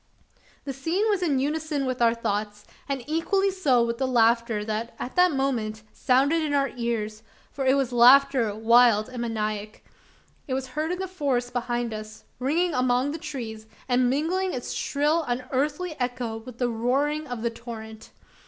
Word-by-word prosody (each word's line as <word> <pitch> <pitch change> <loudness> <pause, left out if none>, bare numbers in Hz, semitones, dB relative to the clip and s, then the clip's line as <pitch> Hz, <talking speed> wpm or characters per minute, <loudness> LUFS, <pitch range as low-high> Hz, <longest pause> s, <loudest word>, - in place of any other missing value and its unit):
The 275 - -3
scene 330 - 0
was 400 -3 0
in 305 -6 +1
unison 295 +1 -1
with 255 -1 -3
our 230 0 +4
thoughts; 210 -2 -3 0.2
and 270 -3 -2
equally 385 +6 +1
so 270 -11 +2
with 235 +1 -3
the 265 - +1
laughter 230 -3 +2
that 220 +2 -3
at 250 - -6
that 360 0 +5
moment 235 -6 -1
sounded 280 +5 +2
in 300 -2 0
our 275 -1 +2
ears 220 -3 -3 0.3
for 270 -2 -3
it 260 - +5
was 265 -3 0
laughter 250 -2 +5
wild 230 0 +4
and 250 -2 -6
maniac. 215 -2 -3 0.6
It 260 - -1
was 260 0 -4
heard 305 +5 -2
in 360 - -2
the 380 +1 -3
forest 270 -9 -1
behind 240 -1 -2
us; 215 0 -8 0.2
ringing 325 +7 +1
among 255 +1 +1
the 320 - -5
trees, 220 -7 -6 0.2
and 250 -1 +3
mingling 350 +7 0
its 245 - -5
shrill 300 +4 +1
unearthly 280 +7 -2
echo 245 -2 -2
with 230 +1 -11
the 245 - +1
roaring 275 +7 0
of 245 -3 -5
the 235 - 0
torrent. 225 -1 -9
255 Hz, 170 wpm, -25 LUFS, 230-290 Hz, 0.6 s, that